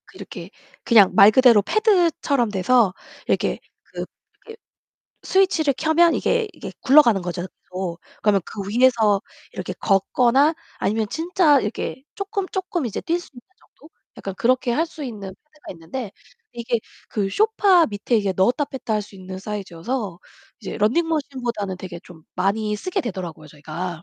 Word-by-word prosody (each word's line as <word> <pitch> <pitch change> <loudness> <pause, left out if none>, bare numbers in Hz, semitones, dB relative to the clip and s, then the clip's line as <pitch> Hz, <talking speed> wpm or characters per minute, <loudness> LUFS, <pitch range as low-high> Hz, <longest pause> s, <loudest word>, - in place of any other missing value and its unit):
그 - - -17
이렇게 - - -9 0.3
그냥 215 -5 +6
말 200 +2 +8
그대로 240 -3 +6
패드처럼 335 - +2
돼서 205 +1 +3 0.3
이렇게 - - 0 0.2
그 - - -7 0.4
이렇게 450 0 -11 0.7
스위치를 335 -7 +2
켜면 330 +3 +3
이게 465 -3 0
이게 - - -9
굴러가는 250 -8 +5
거죠, 175 0 -4
계속. 180 -2 -7 0.2
그러면 205 -2 +3
그 205 - -7
위에서 225 -3 +3 0.3
이렇게 - - -5
걷거나 245 +9 +3 0.2
아니면 215 +1 0
진짜 325 -3 +3
이렇게 230 +4 -4
쪼금쪼금 380 - -3
이제 220 - -4
뛸 340 +1 -1
수 - - -14
있는 245 - -11 0.2
정도? 310 - -21 0.3
약간 195 - -6
그렇게 255 +3 +1
할 320 +7 +1
수 320 -2 -9
있는 210 -6 -7
패드가 300 +6 -13
있는데 190 +7 -7 0.4
이게 235 0 -2 0.3
그 205 -3 -1
소파 400 - +4
밑에 210 +3 -1
이게 200 -3 0
넣었다 240 +10 +2
뺐다 265 -5 -4
할 210 - 0
수 205 - -15
있는 185 0 -8
사이즈여서 195 0 -5 0.4
이제 - - -6
러닝머신보다는 245 - -1
되게 180 -2 -8
좀 165 -3 -15
많이 210 +2 0
쓰게 370 - -2
되더라고요, 175 - -6
저희가. 160 +3 -6
235 Hz, 340 characters per minute, -22 LUFS, 195-305 Hz, 0.7 s, 말